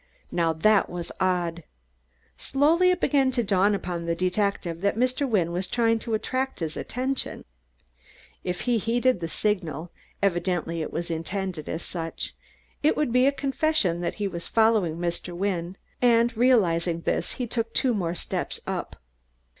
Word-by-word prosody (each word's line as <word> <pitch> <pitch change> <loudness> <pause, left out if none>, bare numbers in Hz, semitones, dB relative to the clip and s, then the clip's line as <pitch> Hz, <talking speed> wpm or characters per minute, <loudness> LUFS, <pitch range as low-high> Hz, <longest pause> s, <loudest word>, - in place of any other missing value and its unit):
Now 165 -2 +2
that 200 +6 +3
was 175 -1 -5
odd. 175 -2 0 0.7
Slowly 325 +6 +3
it 365 - +2
began 275 -3 +3
to 240 -2 +1
dawn 200 0 +3
upon 175 -3 -4
the 170 0 0
detective 185 -2 -1
that 200 +1 +1
Mr. 255 +3 +1
Wynne 180 -7 +2
was 180 +2 -2
trying 230 +1 +2
to 225 0 -1
attract 260 +4 -2
his 160 -3 -3
attention. 260 +2 -3 1.0
If 180 -1 -3
he 240 -2 +1
heeded 240 +1 +2
the 165 - -3
signal 170 -4 -2 0.3
evidently 175 -3 0
it - - -4
was 170 0 -3
intended 175 0 -3
as 160 - -3
such 165 -2 -4 0.5
it 305 - +3
would 300 -5 +1
be 250 +1 +5
a - - +5
confession 275 - +1
that 175 - -2
he 205 -1 -1
was 170 -3 -5
following 220 -8 +3
Mr. 175 0 -3
Wynne, 185 -1 -2 0.2
and 235 -1 +4
realizing 175 -9 +3
this - - -1
he 250 - -3
took 230 -1 -2
two 255 +1 +2
more 175 -5 -1
steps - - -3
up. - - -4
195 Hz, 160 wpm, -26 LUFS, 170-240 Hz, 1.0 s, be